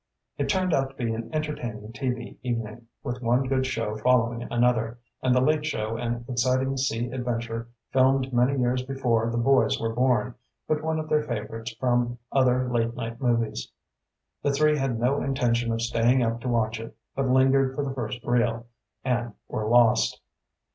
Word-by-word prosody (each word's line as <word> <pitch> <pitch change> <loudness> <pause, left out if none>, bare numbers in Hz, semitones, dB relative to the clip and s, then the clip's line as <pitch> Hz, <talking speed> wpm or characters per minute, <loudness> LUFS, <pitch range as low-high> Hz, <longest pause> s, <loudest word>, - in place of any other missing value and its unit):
It - - 0
turned 185 -2 +1
out 135 -2 +2
to 135 - -19
be 115 - 0
an 115 0 -5
entertaining 120 -9 -4
TV 125 -2 -3
evening, 115 -1 -4 0.2
with 125 0 -4
one 120 +2 +2
good 130 0 0
show 115 -4 -2
following 120 0 +2
another, 120 -1 +1 0.2
and 130 -1 +3
the 125 - +4
late 150 +3 +2
show 110 -7 -2
an 120 0 -3
exciting 130 +2 +1
sea 120 -2 -1
adventure 115 -2 -3 0.2
filmed 135 0 +3
many 125 +3 +3
years 125 +1 +1
before 125 -4 0
the 120 - -2
boys 135 +3 +3
were 115 0 -1
born, 125 0 +2 0.3
but 155 -1 +1
one 160 0 -1
of 155 0 -3
their 150 0 +3
favorites 115 -3 -5
from 120 0 +1
other 130 -1 +3
late 115 -1 0
night 115 0 -5
movies. 115 - 0 0.7
The 145 - +1
three 150 +2 +3
had 135 -5 -1
no 130 +4 +1
intention 120 -4 +1
of 115 0 -1
staying 120 +2 +3
up 115 0 -1
to 125 - -5
watch 110 -1 0
it, 115 -1 -9 0.2
but 135 -1 0
lingered 130 +1 +4
for 145 - -1
the 135 - -3
first 120 -1 -4
reel 120 -1 +1 0.4
and 120 -3 -1
were 110 - -3
lost. 120 0 +4
120 Hz, 175 wpm, -26 LUFS, 115-130 Hz, 0.7 s, the